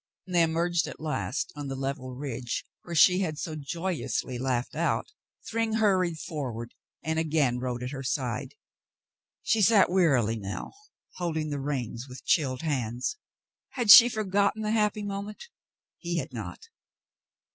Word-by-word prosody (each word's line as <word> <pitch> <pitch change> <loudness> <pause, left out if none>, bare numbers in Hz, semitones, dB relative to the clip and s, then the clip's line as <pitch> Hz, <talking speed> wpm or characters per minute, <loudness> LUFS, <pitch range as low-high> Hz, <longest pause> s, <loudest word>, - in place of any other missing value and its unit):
When 185 - -9
they 175 - +5
emerged 165 +1 +1
at - - -8
last 155 -2 -3
on 145 -1 -5
the 135 - -4
level 135 -1 -4
ridge 125 -3 -4 0.2
where 170 - -7
she 180 +3 +6
fiad 160 -6 -2
so 155 +1 -4
joyously 155 -4 -3
laughed 125 -1 -1
out, 170 - 0 0.4
Thryng 225 -1 -1
hurried 190 -6 +2
forward 125 -8 -5 0.3
and 160 0 -1
again 150 -6 +1
rode 125 -1 -3
at 125 - -4
her 135 -2 -5
side. 130 0 -3 0.9
She 225 - +2
sat 200 -3 +5
wearily 130 - +3
now, 100 0 -5 0.5
holding 160 -4 -2
the 145 - -2
reins 130 -3 -3
with 125 - -11
chilled 135 -3 +1
hands. 125 - -2 0.6
Had 240 -6 +4
she 235 +3 +11
forgotten 205 -1 0
the 215 - 0
happy 210 -1 +1
moment? 205 - -6 0.5
He 175 -1 -3
had 135 -5 -4
not. 105 -7 -7
155 Hz, 150 wpm, -28 LUFS, 130-185 Hz, 0.9 s, she